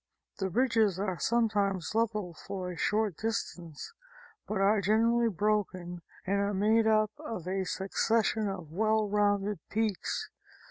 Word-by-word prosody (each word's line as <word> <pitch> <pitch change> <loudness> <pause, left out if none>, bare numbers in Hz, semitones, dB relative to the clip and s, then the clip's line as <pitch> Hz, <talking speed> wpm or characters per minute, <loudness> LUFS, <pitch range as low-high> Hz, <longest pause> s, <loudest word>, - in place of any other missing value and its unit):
The 190 -1 -1
ridges 225 -3 +2
are 190 -3 -2
sometimes 205 -6 +1
level 215 -5 0
for 185 +2 -6
a - - -7
short 210 +1 0
distance, 175 -8 -4 0.5
but 215 - -2
are 200 +1 +4
generally 230 +4 +3
broken 185 -4 -1 0.2
and 200 +2 +1
are 200 0 0
made 220 +3 +3
up 215 -1 +3
of 180 -6 -6
a 190 0 -1
succession 215 +3 +1
of 180 -6 -6
well 215 +3 +2
rounded 205 0 +1
peaks. 215 -4 -1
205 Hz, 135 wpm, -30 LUFS, 190-220 Hz, 0.5 s, are